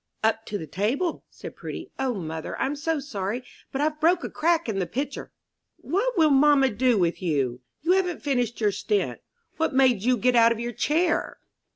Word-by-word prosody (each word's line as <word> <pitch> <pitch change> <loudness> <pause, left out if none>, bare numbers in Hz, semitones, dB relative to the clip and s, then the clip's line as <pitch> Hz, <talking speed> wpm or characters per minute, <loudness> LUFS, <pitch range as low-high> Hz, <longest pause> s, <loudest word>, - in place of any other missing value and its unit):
"Up 220 0 +1
to 205 - -3
the 160 - -6
table," 230 - -1
said - - -10
Prudy. - - -7
"O, 260 -3 0
mother, 160 -4 -5
I'm 275 +2 0
so 310 +2 -1
sorry, 235 -3 -4 0.3
but 270 - -2
I've 305 0 0
broke 335 +2 +3
a - - -5
crack 335 0 +1
in 210 -4 -1
the 180 - -1
pitcher!" 275 - -4 0.5
"What 460 +6 -1
will 315 -3 +5
mamma 275 -1 +5
do 240 +2 +2
with 175 -1 0
you? 135 -8 0 0.2
You 335 - +2
haven't 365 -3 +1
finished 245 -5 0
your 210 -2 +2
stint 410 - -1 0.4
what 320 -4 0
made 255 -6 +4
you 250 +3 +2
get 245 +3 +2
out 230 0 +6
of 230 - -1
your 240 +1 -3
chair?" 320 +9 0
255 Hz, 195 wpm, -25 LUFS, 210-310 Hz, 0.5 s, out